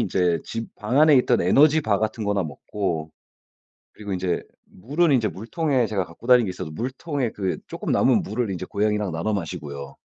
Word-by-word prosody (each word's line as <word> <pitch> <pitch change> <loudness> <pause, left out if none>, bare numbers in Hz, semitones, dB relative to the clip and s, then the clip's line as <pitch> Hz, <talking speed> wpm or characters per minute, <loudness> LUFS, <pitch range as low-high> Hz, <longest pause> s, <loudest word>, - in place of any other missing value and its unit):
인제 90 -3 +1
집 115 0 -6
방 120 +6 +1
안에 155 -2 +7
있던 125 -1 +3
에너지 155 +2 +5
바 105 -6 +1
같은 110 0 -2
거나 100 -2 +1
먹고 80 +1 -4 0.8
그리고 105 -2 -8
인제 90 -1 -1 0.2
물은 145 - 0
인제 115 -5 +2
물통에 130 - -1
제가 100 -4 -1
갖고 85 +9 -14
다니는 125 -2 +6
게 95 - -3
있어서 90 -3 -6
물통에 130 - -3
그 95 -3 -2
쪼끔 - - -4
남은 - - +3
물을 110 +1 -2
인제 90 - -4
고양이랑 105 -2 0
나눠 85 +7 -1
마시고요. 70 -6 -5
105 Hz, 375 characters per minute, -24 LUFS, 90-125 Hz, 0.8 s, 안에